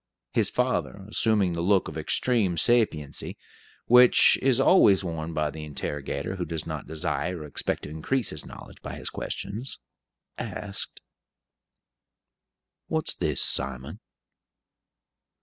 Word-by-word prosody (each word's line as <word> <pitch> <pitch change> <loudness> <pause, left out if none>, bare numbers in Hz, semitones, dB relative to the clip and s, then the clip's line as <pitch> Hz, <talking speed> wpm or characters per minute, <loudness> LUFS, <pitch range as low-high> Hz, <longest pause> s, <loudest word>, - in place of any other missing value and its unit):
His - - +1
father, 95 - -1
assuming 105 -4 +2
the 85 - -2
look 95 +2 +2
of - - -8
extreme 110 -9 +1
sapiency, 80 - +1 0.5
which 125 +1 +7
is 130 -2 +3
always 120 - +5
worn 80 -2 -4
by 75 -2 -1
the 80 +1 -8
interrogator 75 +3 -4
who 90 - -2
does 80 -2 -4
not 80 -2 -6
desire 80 +2 -2
or - - -7
expect 75 - -3
to - - -7
increase 105 - -1
his 75 - -6
knowledge - - -12
by - - -7
his - - -5
questions, 100 +9 -5 0.6
asked: 100 -1 -5 1.9
"What's 160 -1 -1
this, 75 -6 +1
Simon?" 65 -1 0
85 Hz, 125 wpm, -26 LUFS, 75-110 Hz, 1.9 s, which